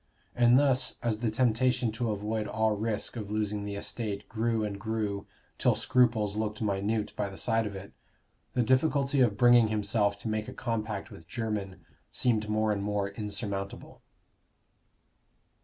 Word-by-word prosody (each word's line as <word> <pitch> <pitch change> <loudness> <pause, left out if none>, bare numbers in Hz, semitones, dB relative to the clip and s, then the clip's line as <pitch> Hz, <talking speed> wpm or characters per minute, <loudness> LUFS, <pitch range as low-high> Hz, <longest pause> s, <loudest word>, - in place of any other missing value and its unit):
And 120 0 +6
thus, 135 -2 +3
as 115 -3 0
the 115 -1 0
temptation 125 +1 +2
to 115 +1 -2
avoid 105 +1 -2
all 110 +1 +1
risk 110 +2 -2
of 105 -4 -5
losing 105 -1 -1
the 100 0 -4
estate 100 0 -4
grew 115 0 0
and 100 -1 -5
grew 105 -2 -2 0.3
till - - +3
scruples 115 -5 +2
looked 105 0 -2
minute 105 +1 -1
by 100 - -2
the 95 - -10
side 115 -1 +1
of 100 - -7
it, 95 +1 -9 0.6
the 125 - +3
difficulty 135 +2 +2
of 110 -5 +3
bringing 120 0 +6
himself 105 -1 +1
to - - -5
make 110 0 -2
a - - -7
compact 110 -4 -3
with 80 - -12
Jermyn 100 -2 -4 0.3
seemed 110 -4 +1
more 110 0 +1
and 100 -1 -1
more 100 0 -1
insurmountable. 100 -1 -4
110 Hz, 155 wpm, -29 LUFS, 105-115 Hz, 0.6 s, And